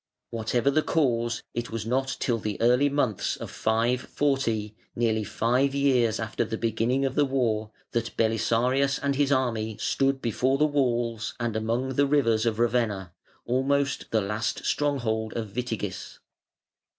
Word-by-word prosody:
Whatever 115 +4 +1
the 155 - +3
cause, 120 -7 0
it 120 +1 -3
was 115 -1 -4
not 135 +3 -1
till 120 -3 0
the 105 -1 -4
early 125 +5 +4
months 130 -8 0
of - - -8
540, 115 -1 0 0.2
nearly 110 -2 +1
five 125 +6 +1
years 125 -6 +2
after 110 +1 -1
the 110 0 -4
beginning 115 +4 0
of 135 - -1
the 145 - +3
war, 120 -6 0 0.2
that 115 0 -2
Belisarius 120 +5 +2
and 140 -1 -1
his 140 0 +1
army 115 -5 0
stood 135 0 +1
before 130 +3 +1
the 150 - +4
walls 120 -6 0
and 120 -2 -2
among 115 +4 -1
the 140 0 +4
rivers 120 -6 +2
of 110 -2 0
Ravenna, 115 -6 0 0.3
almost 140 +3 0
the 110 - +2
last 105 +3 -2
stronghold 115 -7 0
of 110 -4 -5
Witigis. 115 -6 -4
120 Hz, 150 wpm, -26 LUFS, 110-135 Hz, 0.3 s, early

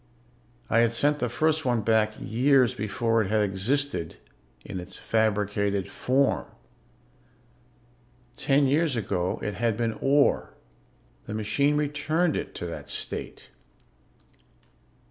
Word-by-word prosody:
I 115 - +3
had 115 0 +3
sent 145 +5 +2
the 125 - -1
first 155 +5 +1
one 120 -4 +1
back 110 0 +2
years 130 +1 +3
before 115 +2 0
it 95 - -2
had 110 0 +2
existed 105 - -1 0.5
in 95 - -5
its 90 +1 -8
fabricated 105 -2 0
form. 135 +2 +1 1.9
Ten 140 0 +2
years 145 +1 +2
ago 90 -5 -1
it 105 - -2
had 115 +1 -1
been 115 -1 0
ore. 140 +1 +2 0.7
The 105 - -4
machine 140 +7 +1
returned 150 +3 0
it - - -4
to - - -5
that 85 - -7
state. 65 - -6
115 Hz, 120 wpm, -26 LUFS, 105-140 Hz, 1.9 s, I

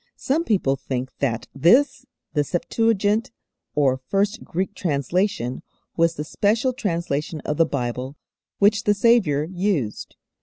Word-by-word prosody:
Some 295 +5 0
people 160 - +1
think 130 -1 -4
that 120 -5 -1
this, 245 - +3 0.3
the 150 -2 +2
Septuagint, 210 +6 +1 0.5
or 135 -3 +2
first 200 +3 0
Greek 190 +4 -3
translation, 145 - -1 0.3
was 165 0 +2
the 150 - -3
special 220 - +1
translation 170 - -2
of 150 - -3
the 165 - +4
Bible 130 0 -3 0.4
which 205 +1 +3
the 205 - +3
Saviour 200 -10 +3
used. 175 - -2
170 Hz, 125 wpm, -23 LUFS, 140-210 Hz, 0.5 s, the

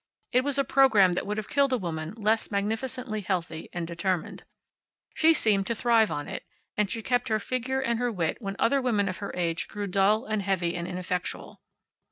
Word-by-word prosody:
It 250 - +4
was 285 0 0
a 275 - +3
program 220 -10 +5
that 180 - -2
would 210 +1 -2
have 215 - -3
killed 280 -2 +2
a 255 - +3
woman 165 -4 -4
less 220 0 +1
magnificently 220 +3 -2
healthy 175 -4 -3
and 175 -1 -3
determined. 170 +1 -3 0.7
She 320 +1 +5
seemed 205 -10 +2
to 230 - 0
thrive 225 -1 +4
on 145 - -4
it, - - -6 0.3
and 210 -2 +1
she 225 +2 -3
kept 245 +1 +1
her 220 - +2
figure 255 +4 -2
and 235 -3 0
her 245 -1 0
wit 170 -7 -1
when 195 -2 -4
other 275 +3 +2
women 215 -6 +1
of 185 - -3
her 200 - -5
age 170 -2 -1
grew 205 -1 -4
dull, 200 +4 +2
and 215 -3 -1
heavy, 185 -3 0
and 170 0 -3
ineffectual. 180 0 -4
210 Hz, 205 wpm, -27 LUFS, 185-245 Hz, 0.7 s, program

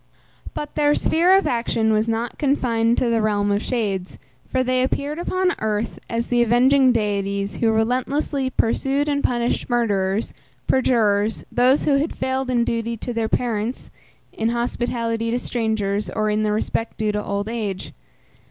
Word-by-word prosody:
But 295 - -5
their 295 -1 +3
sphere 355 +4 +4
of 390 - +1
action 230 -2 +1
was 215 +1 +1
not 230 +1 -2
confined 240 -5 +1
to 245 - +1
the 225 -1 +2
realm 205 -1 +1
of 200 +1 +1
shades, 200 -8 -2 0.3
for 260 -1 +1
they 255 0 +1
appeared 285 +4 -1
upon 370 +1 0
earth 215 +1 -2
as 230 0 -2
the 240 -1 +3
avenging 255 +3 +4
deities 200 -3 -1
who 225 -1 +2
relentlessly 260 +4 0
pursued 270 +4 0
and 285 -1 0
punished 240 0 0
murderers, 205 -4 0 0.3
perjurers, 220 -5 +1
those 255 +3 +3
who 280 -2 +3
had 300 +4 -2
failed 260 0 -1
in 240 -2 +2
duty 230 0 -2
to 245 - -5
their 225 -1 -1
parents, 235 0 -2 0.4
in 225 +1 -1
hospitality 235 -1 -2
to 235 - 0
strangers, 220 -4 -1
or 215 -1 -1
in 210 +1 +1
the 215 -1 +1
respect 220 +2 -2
due 215 -1 0
to 210 0 -2
old 200 +1 -3
age. 215 -5 -4
230 Hz, 160 wpm, -22 LUFS, 215-255 Hz, 0.4 s, sphere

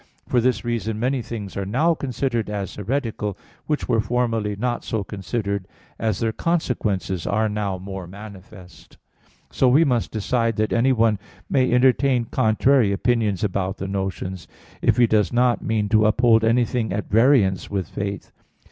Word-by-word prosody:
For 120 - +2
this 125 -2 0
reason 110 -2 -2
many 130 +2 0
things 105 -4 -7
are 100 - -2
now 135 - +2
considered 130 -6 -2
as 100 -2 -4
heretical 105 -3 -3 0.3
which 150 -1 -1
were 115 - +2
formerly 115 -2 -1
not 120 +3 -2
so 110 -3 -2
considered, 100 -1 -3 0.3
as 110 -4 0
their 115 -1 0
consequences 110 - -1
are 110 +2 +1
now 105 -3 -2
more 95 -1 -7
manifest. 95 -2 -13 0.5
So 130 - +2
we 140 +6 +5
must 120 -4 0
decide 115 +1 0
that 110 0 0
anyone 115 -4 +3 0.3
may 130 -2 +2
entertain 125 0 +3
contrary 110 +1 +2
opinions 105 -2 0
about 95 -1 -1
the 95 - -4
notions, 95 -2 -4 0.3
if - - +2
he 120 - +6
does 105 -3 +2
not 120 0 +2
mean 110 -2 0
to 110 0 +4
uphold 115 0 +4
anything 115 -1 +1
at 100 +2 -3
variance 110 -4 +3
with 95 -3 -2
faith. 100 -2 -5
110 Hz, 155 wpm, -22 LUFS, 100-120 Hz, 0.5 s, he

